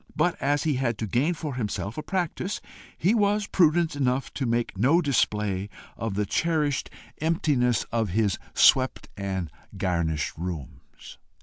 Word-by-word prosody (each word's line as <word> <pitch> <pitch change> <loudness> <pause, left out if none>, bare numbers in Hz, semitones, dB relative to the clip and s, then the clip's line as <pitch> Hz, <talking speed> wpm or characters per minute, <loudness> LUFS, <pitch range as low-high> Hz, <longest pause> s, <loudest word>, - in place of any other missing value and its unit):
But 175 - +2
as 145 +1 +1
he 150 -5 +1
had 120 -4 0
to 110 - -2
gain 135 - +1
for 155 -3 -4
himself 105 -3 -3
a 155 - -3
practice, 185 +2 -2 0.4
he 185 +7 +3
was 210 -1 +2
prudent 170 -3 +3
enough 130 -1 0
to 135 - -2
make 115 -2 0
no 135 - +4
display 105 - 0 0.3
of 110 -3 -3
the 105 0 0
cherished 150 - 0 0.3
emptiness 145 -7 +1
of 115 -3 0
his 100 +1 +1 0.2
swept 130 0 +4
and 95 -4 -3 0.3
garnished 80 -5 -1
rooms. 80 -6 -8
125 Hz, 145 wpm, -26 LUFS, 100-155 Hz, 0.4 s, no